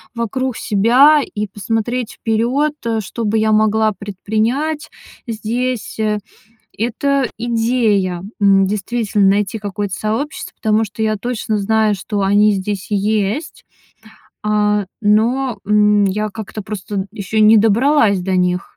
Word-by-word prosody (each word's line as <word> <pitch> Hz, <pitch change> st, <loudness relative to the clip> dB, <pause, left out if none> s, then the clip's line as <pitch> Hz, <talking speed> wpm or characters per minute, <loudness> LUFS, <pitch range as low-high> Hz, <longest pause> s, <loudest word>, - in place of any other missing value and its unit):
вокруг 240 Hz, +2 st, -2 dB
себя 250 Hz, +9 st, +4 dB
и 210 Hz, -4 st, -4 dB
посмотреть 225 Hz, +4 st, -3 dB
вперёд, 245 Hz, +7 st, 0 dB
э, 225 Hz, -1 st, 0 dB
что 230 Hz, +4 st, -6 dB
бы 215 Hz, +1 st, +1 dB
я 220 Hz, 0 st, +2 dB
могла 215 Hz, 0 st, +2 dB
предпринять 220 Hz, -, -2 dB, 0.4 s
здесь. 235 Hz, +2 st, -3 dB, 0.8 s
Это 265 Hz, +4 st, 0 dB
идея, 225 Hz, -6 st, 0 dB, 0.2 s
м, 195 Hz, -1 st, +4 dB
действительно, 210 Hz, 0 st, 0 dB
найти 205 Hz, +2 st, +1 dB
какое-то 205 Hz, -1 st, -4 dB
сообщество, 225 Hz, +8 st, -3 dB
потому 220 Hz, 0 st, +1 dB
что 210 Hz, +1 st, -8 dB
я 215 Hz, 0 st, +1 dB
точно 220 Hz, -1 st, -2 dB
знаю, 215 Hz, +1 st, +1 dB
что 200 Hz, +1 st, -3 dB
они 205 Hz, +2 st, +4 dB
здесь 195 Hz, 0 st, -3 dB
есть. 210 Hz, +8 st, -1 dB, 0.8 s
А, 210 Hz, -1 st, +1 dB, 0.2 s
но, 230 Hz, +4 st, +1 dB
м, 210 Hz, -1 st, +4 dB
я 210 Hz, +2 st, -1 dB
как-то 215 Hz, 0 st, -7 dB
просто 200 Hz, -1 st, -5 dB
ещё 215 Hz, 0 st, -3 dB
не 215 Hz, +1 st, +7 dB
добралась 225 Hz, 0 st, +3 dB
до 185 Hz, +1 st, -1 dB
них. 180 Hz, 0 st, -1 dB
215 Hz, 125 wpm, -17 LUFS, 205-235 Hz, 0.8 s, не